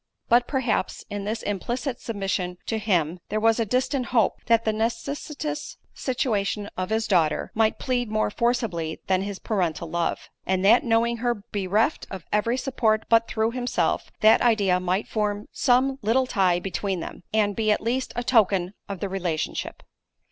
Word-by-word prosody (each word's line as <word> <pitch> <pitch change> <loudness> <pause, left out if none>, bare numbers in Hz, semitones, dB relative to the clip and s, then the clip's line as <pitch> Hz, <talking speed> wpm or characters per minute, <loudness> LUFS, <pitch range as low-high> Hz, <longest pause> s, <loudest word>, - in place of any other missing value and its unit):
But, 240 +1 +4
perhaps, 260 -8 -1
in 205 -1 -4
this 220 +2 -3
implicit 240 +6 -3
submission 195 -4 -2
to 225 - -1
him, 180 -5 0
there 215 - 0
was 225 +1 +3
a 225 - 0
distant 255 +2 0
hope, 230 -5 +1
that 230 0 +3
the 220 - +2
necessitous 290 +6 -3 0.2
situation 210 -5 -1
of 185 0 -3
his 220 0 0
daughter, 165 -7 +1
might 220 0 +2
plead 245 -3 -1
more 215 -1 0
forcibly 220 -10 -1
than 185 -1 +2
his 200 0 -4
parental 175 -7 -1
love; 170 -1 -1 0.2
and 190 0 0
that 230 +5 +6
knowing 235 0 +2
her 240 +1 0 0.2
bereft 205 - 0
of 190 -3 -7
every 230 +4 +2
support 225 -5 +1
but 230 0 +4
through 220 +1 0
himself, 245 0 -1
that 215 +1 +6
idea 205 -6 +3
might 185 +3 -1
form 210 -1 -1
some 265 +1 +2
little 235 +5 +2
tie 190 -8 +2
between 195 0 -2
them, - - -7
and 210 -2 +2
be 220 -1 0
at 210 - +2
least 250 +3 -1
a 240 - -2
token 195 -6 +3 0.2
of 195 -3 -5
the 200 - -1
relationship. 180 -5 -3
220 Hz, 170 wpm, -25 LUFS, 195-240 Hz, 0.2 s, that